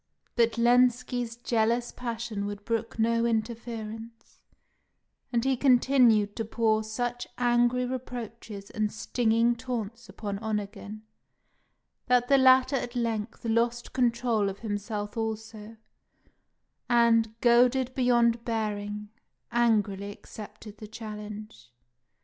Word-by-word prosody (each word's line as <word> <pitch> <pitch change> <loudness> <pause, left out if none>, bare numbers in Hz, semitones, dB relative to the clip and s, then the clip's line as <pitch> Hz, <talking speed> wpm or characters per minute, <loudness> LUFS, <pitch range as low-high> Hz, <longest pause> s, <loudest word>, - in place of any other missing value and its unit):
But 235 -1 +3
Lenski's 245 0 +2
jealous 235 0 0
passion 230 -4 -4
would 205 0 -7
brook 230 -1 -2
no 230 +1 +2
interference; 225 0 -4 0.9
and 235 0 0
he 265 0 +3
continued 245 -5 +4
to 225 - -1
pour 220 -1 +1
such 245 +2 -3
angry 240 +1 +2
reproaches 230 -5 -7
and 215 -1 -1
stinging 230 +1 +1
taunts 235 -3 -5
upon 200 -2 -5
Onegin, 210 0 -5 1.0
that 245 -1 +3
the 275 -1 +6
latter 260 +1 +5
at 245 0 -5
length 230 -2 -3
lost 235 +1 0
control 235 -4 +1
of 195 +1 -8
himself 205 0 -4
also, 220 0 -5 1.1
and, 230 -2 +3
goaded 245 +2 +4
beyond 240 -2 +2
bearing, 210 -2 -3 0.4
angrily 210 -4 +1
accepted 210 +1 -11
the 215 - -8
challenge. 210 - -9
230 Hz, 105 wpm, -28 LUFS, 215-240 Hz, 1.1 s, the